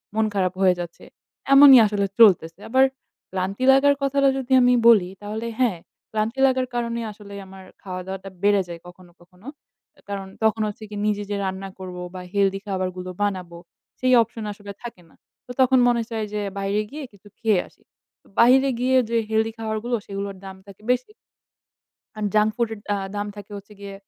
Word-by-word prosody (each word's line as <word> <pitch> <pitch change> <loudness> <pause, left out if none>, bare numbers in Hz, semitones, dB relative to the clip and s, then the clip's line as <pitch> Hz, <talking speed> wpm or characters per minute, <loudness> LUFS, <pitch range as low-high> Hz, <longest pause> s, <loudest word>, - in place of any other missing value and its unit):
মন 220 0 +2
খারাপ 185 -2 0
হয়ে 185 -1 +5
যাচ্ছে। 175 -1 -7 0.5
এমনই 275 -2 +10
আসলে 205 -1 0
চলতেছে। 180 -5 +5
আবার 260 +2 +4 0.5
ক্লান্তী 190 +5 -3
লাগার 280 +1 +5
কথাটা 275 0 +3
যদি 265 0 -6
আমি 250 0 +5
বলি 200 -6 +6
তাহলে 215 +3 -5
হ্যাঁ, 230 -9 +2 0.3
ক্লান্তী 220 +4 -2
লাগার 260 -1 0
কারণেই 235 -1 -2
আসলে 200 -1 -13
আমার 190 0 -12 0.2
খাওয়া-দাওয়াটা 190 +1 -6
বেড়ে 205 -1 +4
যায় 170 -1 -8
কখনো, 180 0 -15
কখনো। 180 +6 -19 0.6
কারণ 195 -1 -4 0.2
তখন 220 0 +2
হচ্ছে 210 +1 -7
গিয়ে 205 -1 -5
নিজে 205 -1 -1
যে - - 0
রান্না 190 +1 -4
করব 180 -1 -7 0.2
বা 180 - -6
healthy 195 -1 +1
খাবারগুলো 185 -1 -3
বানাবো 185 -4 -2 0.4
সেই 255 0 +2
option 225 0 -9
আসলে 205 0 -9
থাকে 230 -7 -8
না। - - -24 0.3
তো 250 - -9
তখন 260 0 +5
মনে 235 -1 +2
চায় 220 -2 -3
যে 210 - -2 0.2
বাইরে 200 +2 0
গিয়ে 300 0 -7
কিছু 200 +1 -19
খেয়ে 215 -6 +2
আসি। - - -25 0.4
তো - - -25
বাইরে 265 +3 +6
গিয়ে 260 +1 +3
যে 235 - +1
healthy 220 0 +1
খাবারগুলো 225 +2 -2
সেগুলোর 200 0 -5
দাম 190 0 -8
থাকে 200 +1 -14
বেশি। 250 +11 -1 1.0
আর 215 - -5
junk 215 0 +4
food 235 -2 0
এর 210 - -9
আ - - +1 0.2
দাম 205 0 -2
থাকে 205 0 -11
হচ্ছে 200 +1 -13
গিয়ে 200 -1 -8
205 Hz, 180 wpm, -23 LUFS, 190-235 Hz, 1.0 s, এমনই